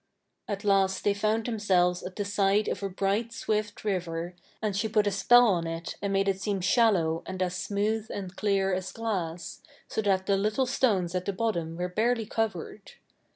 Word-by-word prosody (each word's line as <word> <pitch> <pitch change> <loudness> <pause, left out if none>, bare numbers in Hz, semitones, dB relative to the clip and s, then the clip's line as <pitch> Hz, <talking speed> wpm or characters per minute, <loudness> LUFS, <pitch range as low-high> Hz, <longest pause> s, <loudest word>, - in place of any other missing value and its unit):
At 200 0 -4
last 195 -2 +2
they 205 - +3
found 215 +2 0
themselves 185 -6 +2
at 180 0 -7
the 205 - -2
side 200 +1 +2
of 190 - -2
a 195 - -2
bright 200 +5 -1
swift 215 -2 -2
river, 175 -3 -2 0.3
and 210 -3 -2
she 215 +3 0
put 210 -1 +2
a 205 - +1
spell 240 +6 +6
on 170 -4 0
it 165 0 -5
and 200 - -1
made 195 0 +1
it 195 -1 0
seem 200 -1 -1
shallow 185 -5 +3
and 185 0 -5
as 180 0 -2
smooth 210 +3 -1
and 190 -2 -6
clear 195 -2 +1
as 185 0 -3
glass, 185 -7 -4 0.3
so - - -2
that 190 -2 +1
the 200 0 +2
little 215 +6 +1
stones 205 -9 +1
at 180 0 -2
the 200 - -1
bottom 180 -6 -2
were 180 +1 -1
barely 225 +5 0
covered. 210 -2 -3
200 Hz, 195 wpm, -28 LUFS, 185-215 Hz, 0.3 s, spell